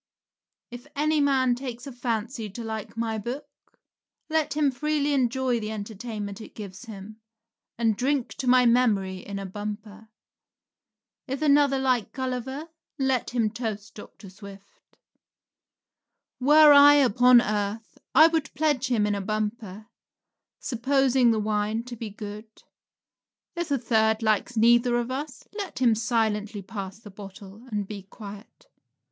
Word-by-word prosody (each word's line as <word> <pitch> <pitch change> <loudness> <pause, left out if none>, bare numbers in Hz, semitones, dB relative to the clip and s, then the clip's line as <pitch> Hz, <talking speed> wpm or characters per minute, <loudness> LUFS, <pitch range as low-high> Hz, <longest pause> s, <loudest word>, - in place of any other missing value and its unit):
If 245 +3 -10
any 305 +1 +1
man 265 -3 +3
takes 245 -1 -6
a 275 - -7
fancy 235 -2 -3
to 230 +5 -8
like 220 0 -6
my 225 -1 -2
book, 245 +7 -5 0.9
let 315 -2 0
him 295 -2 +2
freely 295 +2 0
enjoy 255 -2 +1
the 215 -1 -5
entertainment 210 -1 -6
it - - -12
gives 200 +1 -9
him, 215 0 -10 0.6
and 225 -2 +1
drink 265 +2 0
to 260 - -4
my 250 0 +5
memory 215 -6 +2
in 200 +1 -7
a 195 - -5
bumper. 210 +2 -7 1.2
If 270 +3 -3
another 285 -2 +4
likes 255 -5 +1
Gulliver, 265 +4 -4 0.3
let 265 -3 0
him 230 -3 0
toast 220 -3 -5
Dr. 205 -2 -12
Swift. 200 0 -15 1.4
Were 295 +3 +7
I 285 0 +8
upon 250 -2 +6
earth 210 0 -3 0.2
I 315 - +9
would 325 -2 +1
pledge 290 -4 +1
him 230 -5 +1
in 210 - 0
a 200 - -2
bumper, 215 0 -4 0.7
supposing 265 0 +2
the 225 - +2
wine 215 +1 -1
to 245 0 -8
be 225 -1 -6
good. 210 +1 -10 0.9
If 345 -1 -3
a 280 - +2
third 220 -2 +1
likes 220 +2 0
neither 240 +2 +4
of 240 +1 -2
us, 275 +1 -5
let 400 -4 -5
him 245 -3 +4
silently 220 -2 -1
pass 195 -2 -7
the 215 -2 -13
bottle 200 +3 -12
and 205 -3 -2
be 205 -1 -7
quiet. 200 +2 -12
230 Hz, 140 wpm, -26 LUFS, 210-260 Hz, 1.4 s, I